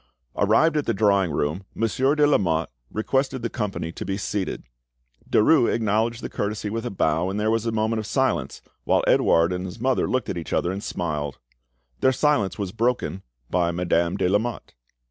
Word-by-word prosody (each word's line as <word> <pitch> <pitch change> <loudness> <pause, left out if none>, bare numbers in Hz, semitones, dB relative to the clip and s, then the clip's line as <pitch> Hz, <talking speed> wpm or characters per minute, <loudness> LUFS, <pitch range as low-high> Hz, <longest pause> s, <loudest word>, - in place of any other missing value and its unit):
Arrived 160 0 +3
at 150 - -1
the - - +1
drawing 100 -3 +3
room, 75 +5 -1
Monsieur 130 +6 +1
de 150 -1 +4
Lamotte 85 - +1 0.2
requested 130 +3 -1
the 115 - -2
company 100 -7 -3
to - - -7
be 95 +1 -2
seated. 100 -1 -3 0.7
Derues 120 +3 +4
acknowledged 115 +2 0
the - - -2
courtesy 105 0 -3
by 115 +2 -2
a 120 +2 -4
bow, 85 -2 0
and 100 +2 -2
there 110 +1 +1
was 115 0 0
a - - +1
moment 110 0 0
of 110 - -5
silence, - - -1 0.2
while - - +2
Edouard 85 +2 +3
and 90 0 -3
his 95 +5 -9
mother 130 +2 +1
looked 130 0 -1
at - - -3
each 80 - -6
other 85 - +1
and 100 +2 -5
smiled. 75 -5 -3 0.6
The 130 - +4
silence 125 -9 +1
was 100 -4 -3
broken 115 -6 -1 0.3
by 90 -1 +2
Madame 85 +1 0
de - - +1
Lamotte. 110 +5 -1
105 Hz, 185 wpm, -24 LUFS, 90-115 Hz, 0.7 s, de